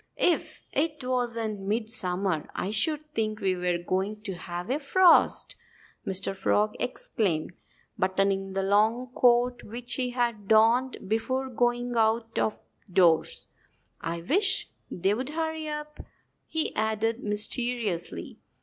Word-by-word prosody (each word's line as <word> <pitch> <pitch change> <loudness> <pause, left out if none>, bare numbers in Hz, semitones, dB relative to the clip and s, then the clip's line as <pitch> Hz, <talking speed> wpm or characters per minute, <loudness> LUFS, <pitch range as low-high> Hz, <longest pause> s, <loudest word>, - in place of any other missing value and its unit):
"If 350 - 0
it 300 -1 -1
wasn't 235 -4 -2
midsummer 195 -5 +2
I 195 - -2
should 305 +8 0
think 215 -3 -1
we 190 -1 0
were 180 -1 0
going 190 +4 -2
to 200 -3 -4
have 175 +3 -6
a 285 - 0
frost!" 350 +5 +4 0.5
Mr. 190 0 -2
Frog 210 +2 +1
exclaimed, 195 -10 -2 0.5
buttoning 195 +1 0
the 195 0 -1
long 220 +5 +2
coat 245 0 +3
which 240 +3 -4
he 250 -1 0
had 235 -5 -2
donned 230 +3 +3
before 260 +5 -1
going 245 0 0
out 225 0 +1
of 215 - -1 0.3
doors. 175 -3 +2 0.5
"I 170 0 -4
wish 375 - 0 0.2
they'd 205 +9 -1
hurry 320 0 -3
up!" 300 0 -6 0.5
he 320 -1 -2
added 220 +2 -1
mysteriously. 210 -2 0
220 Hz, 120 wpm, -27 LUFS, 195-250 Hz, 0.5 s, frost